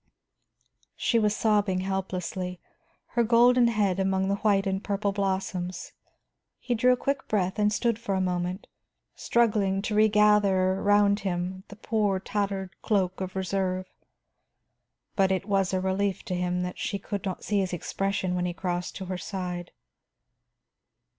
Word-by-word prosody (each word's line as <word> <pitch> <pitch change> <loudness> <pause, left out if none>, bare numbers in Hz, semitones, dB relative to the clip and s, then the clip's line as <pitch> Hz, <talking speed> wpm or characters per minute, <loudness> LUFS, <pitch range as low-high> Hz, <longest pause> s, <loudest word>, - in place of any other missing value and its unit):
She 230 - +1
was 210 -1 +2
sobbing 205 -4 +1
helplessly, 185 -1 -3 0.5
her 235 - +1
golden 240 +2 +5
head 205 -5 +1
among 190 0 +1
the 200 - +1
white 200 -1 +2
and 190 0 -1
purple 200 0 -1
blossoms. 190 -2 -2 0.7
He 245 - -2
drew 250 +2 +4
a - - -1
quick 275 +2 -2
breath 190 -2 0
and 210 0 +3
stood 230 +1 0
for 230 -5 -2
a - - +1
moment, 180 +1 -2 0.5
struggling 210 -5 +1
to 215 - -2
regather 210 -3 +4
around 205 +1 +3
him 185 0 -3
the 205 - -11
poor 210 -3 0
tattered 195 -2 -2
cloak 190 -3 0
of 185 0 -5
reserve. 185 0 -2 1.2
But 190 -1 +3
it 190 0 0
was 195 -2 +1
a 190 - +1
relief 190 +1 -1
to - - -4
him 180 0 -1
that 180 0 -5
she 200 - -2
could 200 -1 -5
not 190 -2 -4
see 205 -1 0
his 190 -2 -1
expression 190 +1 -2
when 180 0 0
he 175 - -3
crossed 180 -1 -3
to 190 - -6
her 185 0 -4
side. 180 -1 -5
195 Hz, 155 wpm, -27 LUFS, 185-210 Hz, 1.2 s, golden